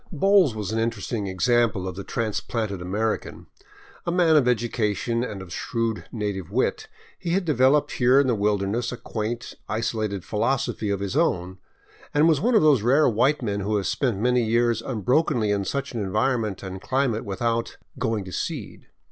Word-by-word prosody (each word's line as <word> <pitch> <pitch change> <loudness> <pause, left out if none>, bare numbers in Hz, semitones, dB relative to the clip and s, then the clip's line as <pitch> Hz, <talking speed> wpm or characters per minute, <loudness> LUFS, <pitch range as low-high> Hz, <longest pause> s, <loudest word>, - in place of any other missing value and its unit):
Bowles 185 - +4
was 105 -2 -4
an 110 - -1
interesting 115 -2 -2
example 110 0 +1
of 90 - -5
the 100 - -6
transplanted 110 -2 -3
American. 105 +5 -2 0.6
A 170 - -2
man 170 -3 +4
of 140 -5 +4
education 115 -1 0
and 100 -6 -5
of 90 -2 -10
shrewd 115 -2 -2
native 100 -6 -3
wit, 120 +6 -1 0.3
he 170 - -2
had 190 0 +1
developed 140 -1 +3
here 125 +2 +4
in 140 - +3
the 125 - +2
wilderness 105 +2 0
a 125 - -5
quaint, 115 +1 -4 0.2
isolated 110 -3 -2
philosophy 110 -1 -1
of 100 -1 -1
his 100 +5 -3
own, 95 - 0 0.6
and 150 +2 +5
was 155 -4 +3
one 240 +4 +2
of 215 - +5
those 145 -7 +5
rare 135 +7 +4
white 130 +5 +2
men 100 -3 -1
who 105 +2 -1
have 100 -2 0
spent 125 -8 0
many 125 +3 +2
years 115 +1 +2
unbrokenly 120 - +1
in 100 -1 0
such 140 +3 -3
an 115 - -2
environment 110 +1 -1
and 95 0 -6
climate 130 -3 0
without 115 +3 -2
" - - -18
going 110 -3 -1
to 95 - -8
seed." - - -5
115 Hz, 180 wpm, -24 LUFS, 100-130 Hz, 0.6 s, and